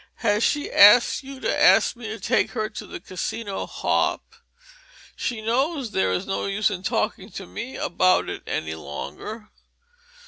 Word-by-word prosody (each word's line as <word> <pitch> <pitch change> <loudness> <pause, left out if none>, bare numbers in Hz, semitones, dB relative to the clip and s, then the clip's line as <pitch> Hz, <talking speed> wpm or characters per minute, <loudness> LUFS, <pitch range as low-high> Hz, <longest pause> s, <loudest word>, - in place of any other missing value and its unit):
Has 205 +1 +3
she 290 +4 0
asked 210 +7 +7
you 275 -1 -10
to - - 0
ask - - +5
me 235 -2 -8
to 220 +1 -6
take - - 0
her 215 0 -2
to 210 -1 -8
the - - -7
Casino 195 +3 -5
hop? - - -1 0.8
She 235 -3 -3
knows 265 +2 0
there 95 -1 +1
is 90 - -1
no 195 - -2
use 200 +1 +1
in 180 - -4
talking 215 -2 -2
to 195 - -7
me 260 +8 -7
about 185 +1 +2
it - - -5
any 80 0 -3
longer." 145 - -8
215 Hz, 165 wpm, -24 LUFS, 190-235 Hz, 0.8 s, asked